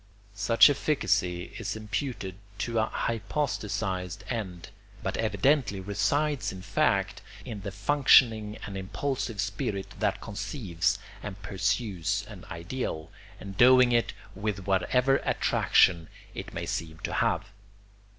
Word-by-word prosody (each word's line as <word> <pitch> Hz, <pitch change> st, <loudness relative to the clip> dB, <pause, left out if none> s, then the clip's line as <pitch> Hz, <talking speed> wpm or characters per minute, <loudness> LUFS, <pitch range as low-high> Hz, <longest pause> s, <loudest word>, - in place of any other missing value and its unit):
Such 105 Hz, +3 st, +6 dB
efficacy 100 Hz, -, 0 dB
is 105 Hz, -3 st, -3 dB
imputed 105 Hz, -1 st, -3 dB, 0.2 s
to 115 Hz, +1 st, -1 dB
a 110 Hz, -, +2 dB
hypostasised 105 Hz, -5 st, -2 dB
end, 95 Hz, -7 st, -4 dB, 0.3 s
but -, -, -2 dB
evidently 110 Hz, +1 st, +1 dB
resides 110 Hz, +5 st, 0 dB
in 95 Hz, -1 st, -9 dB
fact 100 Hz, 0 st, +1 dB, 0.2 s
in 110 Hz, -5 st, -6 dB
the 100 Hz, 0 st, -5 dB
functioning 110 Hz, -1 st, +4 dB
and 100 Hz, -, -7 dB
impulsive 115 Hz, +3 st, -3 dB
spirit 100 Hz, -1 st, -3 dB
that -, -, 0 dB
conceives 100 Hz, -, -2 dB, 0.2 s
and 100 Hz, -2 st, -7 dB
pursues 95 Hz, -2 st, -1 dB
an -, -, -11 dB
ideal, 85 Hz, -2 st, -4 dB, 0.3 s
endowing 125 Hz, +6 st, +5 dB
it 120 Hz, -1 st, +2 dB, 0.2 s
with 100 Hz, -2 st, -3 dB
whatever 125 Hz, +8 st, +3 dB
attraction 85 Hz, -, +3 dB, 0.3 s
it -, -, -7 dB
may -, -, -4 dB
seem 80 Hz, -1 st, -4 dB
to -, -, -2 dB
have. 95 Hz, +6 st, 0 dB
105 Hz, 115 wpm, -28 LUFS, 95-115 Hz, 0.3 s, Such